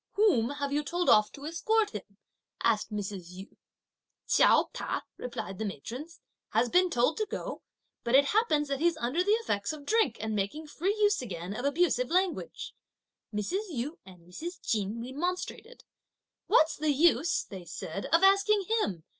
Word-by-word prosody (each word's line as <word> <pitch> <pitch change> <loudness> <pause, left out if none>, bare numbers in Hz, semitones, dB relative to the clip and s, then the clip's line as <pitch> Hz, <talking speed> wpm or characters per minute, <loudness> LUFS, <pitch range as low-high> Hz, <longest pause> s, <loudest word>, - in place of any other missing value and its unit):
"Whom 380 - +3
have 285 -1 -3
you 295 +1 +1
told 345 +5 -1
off 210 0 +5
to 280 - -9
escort 425 +7 +1
him?" 200 -2 -9 0.5
asked 215 -3 +1
Mrs. 195 -4 -5
Yu. 190 +2 -11 0.7
"Chiao - - +4
Ta," - - -3
replied 215 -6 -6
the - - -1
matrons, 245 - -7 0.3
"has 230 +2 +2
been 360 +4 +4
told 245 +1 +1
to 430 - -1
go, - - -5 0.4
but 235 +2 +2
it 280 +1 +7
happens 310 -6 +2
that 275 -1 -1
he's 335 0 +2
under 280 +7 0
the 410 +3 +3
effects 260 - -1
of 295 -2 -10
drink 430 - +2
and 220 0 -2
making 210 +11 -2
free 360 +7 -1
use 415 -4 +3
again 185 -4 -6
of 245 - -4
abusive 280 -4 +2
language." 370 +6 -1 0.6
Mrs. 215 - -1
Yu 295 +2 -4
and 185 -2 -15
Mrs. 340 - -7
Chin 210 +1 -1
remonstrated. 360 - -4 0.6
"What's 315 +1 +4
the 310 +1 0
use," 320 +1 +3
they 190 -3 -9
said, 170 +2 -6
"of 330 +3 +3
asking 395 +1 +5 0.2
him? 180 - -2
285 Hz, 165 wpm, -29 LUFS, 215-355 Hz, 0.7 s, it